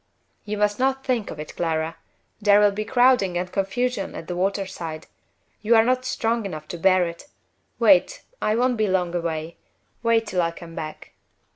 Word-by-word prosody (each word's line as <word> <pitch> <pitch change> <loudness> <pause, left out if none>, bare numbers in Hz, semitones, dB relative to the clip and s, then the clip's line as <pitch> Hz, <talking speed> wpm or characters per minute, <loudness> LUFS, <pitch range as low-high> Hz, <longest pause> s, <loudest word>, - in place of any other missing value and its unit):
"You 210 0 -3
must 210 +1 +1
not 265 +1 0
think 245 -5 0
of 150 - -8
it, 150 - -8
Clara. 160 -1 -1 0.5
There 205 0 +6
will 205 -1 +5
be 210 +2 -3
crowding 245 -7 +3
and 180 0 -3
confusion 200 +2 -1
at - - -7
the 180 - -4
water 195 +2 0
side. 160 -4 -7 0.6
You 225 +2 +3
are 225 - +6
not 255 +1 +1
strong 230 -2 0
enough 155 -6 -6
to 175 - -6
bear 185 0 +4
it. 170 +9 -8 0.5
Wait - - +4 0.2
I 215 - +1
won't 245 +1 +1
be 215 -1 +1
long 180 -2 0
away 165 -1 -3 0.4
wait 230 -1 +2
till 190 -4 0
I 165 - +1
come 170 0 -11
back." 155 -1 -7
195 Hz, 185 wpm, -23 LUFS, 170-230 Hz, 0.6 s, There